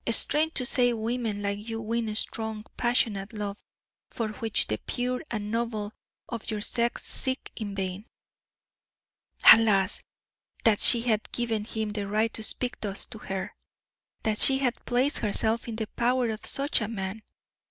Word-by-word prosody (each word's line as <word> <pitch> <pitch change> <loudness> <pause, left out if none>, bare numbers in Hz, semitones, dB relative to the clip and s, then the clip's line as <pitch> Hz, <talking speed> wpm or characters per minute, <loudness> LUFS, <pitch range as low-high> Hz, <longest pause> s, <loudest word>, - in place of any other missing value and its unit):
strange 300 +7 +4
to 255 - +3
say 245 -1 +4
women 225 -2 -3
like 200 0 -2
you 225 0 -4
win 225 -1 -2
strong, 220 -1 -3
passionate 220 -5 0
love, 205 -1 -5 0.5
for 225 -2 -3
which 220 0 0
the 110 - -2
pure 250 +1 -2
and 210 -2 -4
noble 225 -2 -3 0.3
of 230 -3 -5
your 215 -2 -2
sex 235 +3 0
seek 260 -1 -3
in 205 -3 -5
vain." 190 0 -4 1.5
Alas! 205 -4 +2 0.6
that 220 -3 +4
she 235 - +7
had 225 -3 -1
given 230 -3 -1
him 220 -1 -3
the 205 -1 -4
right 215 +2 0
to - - -4
speak 245 +3 +2
thus 200 -2 -1
to 220 - -9
her 195 -2 -5 0.7
that 215 -1 0
she 270 - +8
had 255 -3 -2
placed 255 +4 +1
herself 220 +2 0
in 230 - -5
the 220 0 -3
power 245 0 0
of 215 0 -7
such 275 -2 +1
a 215 - -2
man! 200 -1 -5
220 Hz, 160 wpm, -27 LUFS, 210-240 Hz, 1.5 s, she